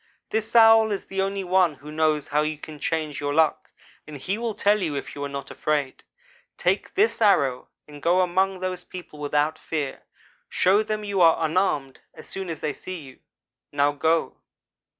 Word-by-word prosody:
This 220 +1 -2
Owl 225 -1 +7
is 200 - -3
the 195 0 -2
only 195 0 -2
one 180 -3 +2
who 145 +2 -11
knows 155 -1 0
how 150 +1 +2
you 155 0 -2
can 150 0 -10
change 155 -1 -2
your 145 0 -2
luck, 160 -1 +2 0.4
and 150 -1 -8
he 185 +9 -2
will 230 -3 -3
tell 205 0 +2
you 160 -5 -2
if 140 - -5
you 145 - -6
are 140 - -3
not 140 -1 -6
afraid. 145 -3 -2 0.6
Take - - -1
this 405 - +2
arrow 140 - +3 0.2
and 145 -1 -12
go 175 +4 +3
among 185 +1 0
those 185 -1 -3
people, 175 -4 -10
without 150 +1 0
fear. 150 -4 -4 0.5
Show 195 +3 +3
them 215 0 -3
you 200 -2 -1
are 165 -1 +5
unarmed 155 -5 0 0.2
as - - -12
soon 190 -2 -5
as 160 -3 -5
they 150 - -2
see 185 +3 -7
you. 135 -4 -13 0.5
Now 145 0 +2
go!' 160 +3 0
165 Hz, 190 wpm, -24 LUFS, 145-195 Hz, 0.6 s, Owl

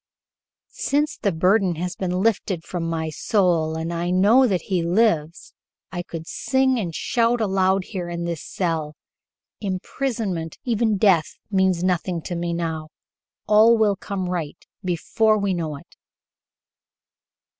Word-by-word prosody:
"Since 295 +2 0
the 200 - +1
burden 185 +2 +2
has 180 +2 -4
been 185 0 -1
lifted 195 -6 0
from 165 -2 -4
my 160 -1 -2
soul 170 -4 +1
and 165 +1 -3
I 170 +1 -2
know 210 +9 +5
that 185 -5 0
he 185 -3 0
lives, 170 -3 +1 0.4
I 175 - -3
could 165 -2 -7
sing 260 +6 +1
and 170 -7 -4
shout 235 0 +1
aloud 190 -2 +2
here 180 -3 -5
in 170 0 -4
this 170 -3 -3
cell. 160 -4 -2 0.6
Imprisonment 195 - -3
even 225 -3 +1
death 185 -6 +3 0.2
means 190 -3 +2
nothing 180 -2 0
to 175 - -4
me 170 0 -2
now. 160 -2 -3 0.6
All 220 +2 +6
will 210 -2 +3
come 195 -1 -4
right 170 -5 -3 0.3
before 205 +5 +1
we 200 -2 0
know 160 -4 -3
it." - - -17
185 Hz, 140 wpm, -23 LUFS, 170-210 Hz, 0.6 s, All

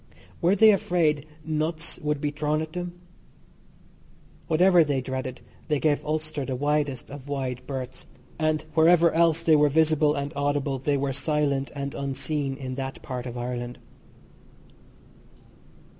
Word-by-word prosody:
Were 180 +3 +4
they 220 +2 +7
afraid 160 -6 +1 0.2
"nuts" 160 +1 -2
would 150 -1 -1
be 145 0 -1
thrown 150 +1 -1
at 155 0 -9
them? 175 -1 -4 1.5
Whatever 175 +1 +5
they 145 -3 0
dreaded, 130 -1 -5 0.3
they 150 -3 +1
gave 150 -1 +1
Ulster 155 -1 -2
the 130 -1 -3
widest 145 -2 -1
of 140 -1 -9
wide 130 -3 -3
berths, 130 -2 -6 0.3
and 155 -1 0
wherever 165 +1 +5
else 165 0 +3
they 160 -2 +5
were 150 0 +5
visible 155 0 +3
and 140 +1 -3
audible, 140 -1 0
they 140 +2 +1
were 135 0 -1
silent 140 -1 0
and 140 0 -4
unseen 140 0 -2
in 130 -2 -5
that 135 0 -6
part 125 -1 -5
of 120 0 -6
Ireland. 120 0 -4
145 Hz, 145 wpm, -26 LUFS, 135-155 Hz, 1.5 s, they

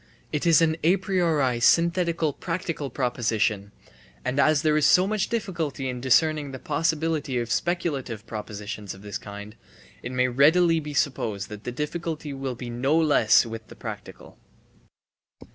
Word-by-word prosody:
It 150 +3 -1
is 165 -1 +6
an 160 -1 +1
a 175 +5 +4
priori 160 - +1
synthetical 170 +2 +2
practical 165 -4 -4
proposition; 110 -5 -1 0.3
* - - -28
and 135 +2 -1
as 155 +1 +3
there 155 -1 +3
is 155 - +4
so 180 - +5
much 210 0 -1
difficulty 170 - -3
in 125 -1 -5
discerning 150 +3 +2
the 130 - -7
possibility 155 -1 -1
of 120 -1 -2
speculative 140 - -2
propositions 105 -2 -6
of 95 - -15
this 105 -1 -5
kind, 105 +1 -9 0.5
it 120 - -6
may 125 0 +2
readily 160 +6 +4
be 150 -1 -7
supposed 115 -9 -1
that 105 0 -9
the 125 - -3
difficulty 150 +2 -4
will 135 -2 -4
be 120 0 -7
no 135 +6 +1
less 145 -10 +4
with 115 -1 -8
the - - -13
practical. - - -9
140 Hz, 160 wpm, -25 LUFS, 120-165 Hz, 0.5 s, is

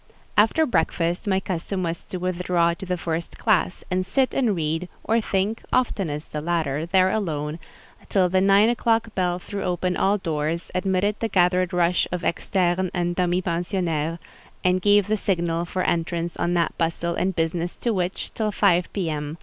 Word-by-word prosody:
After 225 +10 +4
breakfast 170 - 0
my 190 -1 +2
custom 185 +1 -3
was 170 0 -3
to 185 - -5
withdraw 180 -1 +1
to 185 +3 -8
the 180 0 -1
first 165 0 -4
classe, - - +1
and 185 0 +1
sit 255 +8 +1
and 240 -7 +2
read, 165 +2 -2
or 225 +1 +2
think 205 +2 -1
(oftenest 180 -12 -1
the 150 - -3
latter) 160 -2 -1
there 185 +1 +4
alone, 155 -6 -2 0.5
till 190 -2 +3
the 185 +1 +2
nine 200 +2 +5
o'clock 230 -2 +1
bell 180 -2 0
threw 200 +2 -6
open 180 0 -1
all 200 +2 +2
doors, 160 -1 -2
admitted 190 +2 0
the 225 - 0
gathered 180 -2 +2
rush 175 0 +2
of 180 -1 -3
externes 180 +1 0
and 175 -1 0
demi 180 0 +1
pensionnaires, 170 -2 -1 0.5
and 185 0 +2
gave 205 0 +4
the 215 +1 +1
signal 170 -4 0
for 185 +1 -2
entrance 170 0 -1
on 175 +1 0
that 170 -1 +1
bustle 170 +1 0
and 185 +1 -1
business 165 +1 -1
to 235 - -1
which, 185 -1 -3
till 215 -1 -1
five 180 -3 +2
P.M. 155 -5 -3
180 Hz, 175 wpm, -24 LUFS, 170-195 Hz, 0.5 s, nine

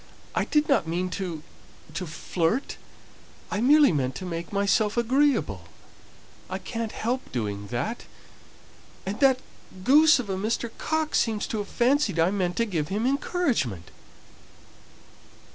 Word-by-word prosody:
I - - 0
did 300 0 +2
not 275 - +2
mean 180 +2 -2
to 175 -5 -4 0.5
to 180 - -4
flirt. 170 - -1 0.7
I 205 - -1
merely 290 +2 +6
meant 135 -4 -1
to 185 - -6
make 170 -1 -5
myself 205 +2 +1
agreeable, 235 - +1 0.8
I 190 - -2
can't 225 +2 -4
help 245 +4 -3
doing 100 -4 -3
that, 125 - -3 1.0
and 195 +2 -4
that 265 -2 +4 0.4
goose 300 - +6
of 250 -5 -4
a 190 -1 -2
Mr. 225 +3 -2
Coxe 315 -1 0
seems 220 -3 0
to 220 - -3
have 205 - -4
fancied 245 - +2
I 165 +3 +3
meant 180 -3 -1
to 230 - +2
give 165 -9 -2
him 210 +6 -1
encouragement." 250 - -1
205 Hz, 140 wpm, -26 LUFS, 170-255 Hz, 1.0 s, merely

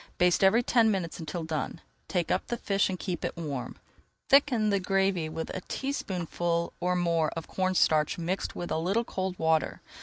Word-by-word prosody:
Baste 180 +1 +3
every 220 +5 +5
ten 230 -2 +4
minutes 185 -6 -2
until 165 +1 -4
done. 160 -2 -3 0.3
Take 175 -4 -1
up - - 0
the 240 - -2
fish 195 -3 +1
and 185 - -2
keep 180 -2 -4
it - - -3
warm. 145 -6 -4 0.5
Thicken 255 -6 +4
the 200 - +2
gravy 190 -3 +1
with 160 +1 -4
a 185 - -4
teaspoonful 175 - -2
or 180 0 +1
more 170 -3 +2
of 165 - -5
cornstarch 180 -5 +2
mixed 175 +3 -2
with 175 - -5
a - - +1
little 195 +8 +1
cold 190 -4 -3
water. 160 -1 +1
180 Hz, 180 wpm, -29 LUFS, 165-195 Hz, 0.5 s, every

